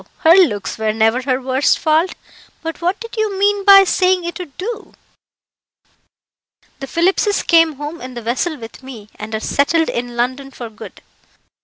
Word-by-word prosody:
her 325 0 +6
looks 295 - +2
were 220 -1 0
never 225 +3 +1
her 255 -1 -1
worst 260 +1 +1
fault. 320 +3 +1 0.5
But 325 +1 -6
what 360 +4 -1
did 460 0 -9
you 430 -3 -1
mean 405 0 +1
by 390 -1 +8
saying 370 0 +1
it 345 +2 -5
would 330 -7 -9
do?" 440 +4 -6 1.9
"The 270 - -6
Phillipses 380 - +1
came 330 -2 +4
home 295 +4 -7
in 255 0 -8
the 240 - -7
vessel 260 +8 -2
with 225 0 -11
me, 235 -6 -11
and 220 +1 -6
are - - -2
settled 320 +7 +1
in 240 0 -4
London 260 +3 -2
for 240 -4 -9
good. 215 - -12
300 Hz, 170 wpm, -18 LUFS, 245-365 Hz, 1.9 s, by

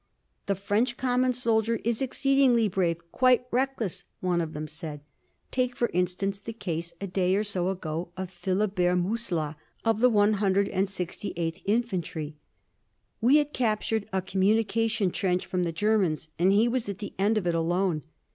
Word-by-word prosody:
"The 200 - +1
French 210 +6 0
common 255 0 +2
soldier 230 -2 +1
is 230 +1 0
exceedingly 265 -3 +3
brave 175 -3 0
quite 255 -1 +4
reckless," 250 -6 -1 0.2
one 180 -2 +1
of 160 -1 -4
them 155 +1 -4
said. 155 -1 -6 0.5
"Take, 250 -1 0
for 240 - 0
instance, 180 +3 0
the 230 - -7
case, 170 -6 -4
a 200 - -4
day 185 0 +1
or 205 - +1
so 185 -3 -1
ago, 170 -2 -3
of 190 -1 -5
Philibert 185 0 +1
Musillat, 175 -6 -1 0.3
of 225 -1 +2
the 250 +2 +6
168th 195 -4 0
Infantry. 185 -8 -1 0.9
We 255 +6 +6
had 295 0 0
captured 220 -2 0
a 190 -1 -1
communication 210 +2 +1
trench 180 -1 0
from 185 -1 -1
the 170 - -1
Germans 180 -4 +1
and 185 +3 +4
he 210 +4 +4
was 240 -3 -1
at 200 - -4
the 205 -1 -7
end 210 +3 +3
of 205 - -1
it, 175 - +1
alone. 170 0 +1
200 Hz, 155 wpm, -27 LUFS, 180-225 Hz, 0.9 s, the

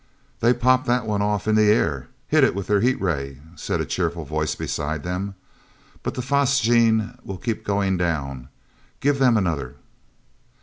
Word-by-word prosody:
"They 120 +2 +3
popped 130 +2 +2
that 125 0 +1
one 105 -2 -1
off 105 0 -1
in 110 - +3
the 105 -1 +4
air—hit 80 - +1
it - - +3
with 100 -1 -3
their 105 -1 +2
heat 130 +3 +2
ray," 70 -7 -2 0.2
said - - -3
a - - -1
cheerful 85 -2 -2
voice 75 +1 -2
beside 75 0 -3
them. 95 +3 -4 0.7
"But - - -4
the 125 - -3
phosgene 120 -4 +2
will 95 - -6
keep 115 +2 -3
on - - -25
going 100 -2 +1
down. 70 -7 -2 0.5
Give 140 0 +1
them 125 -4 +4
another!" 80 -10 -2
100 Hz, 170 wpm, -23 LUFS, 80-120 Hz, 0.7 s, the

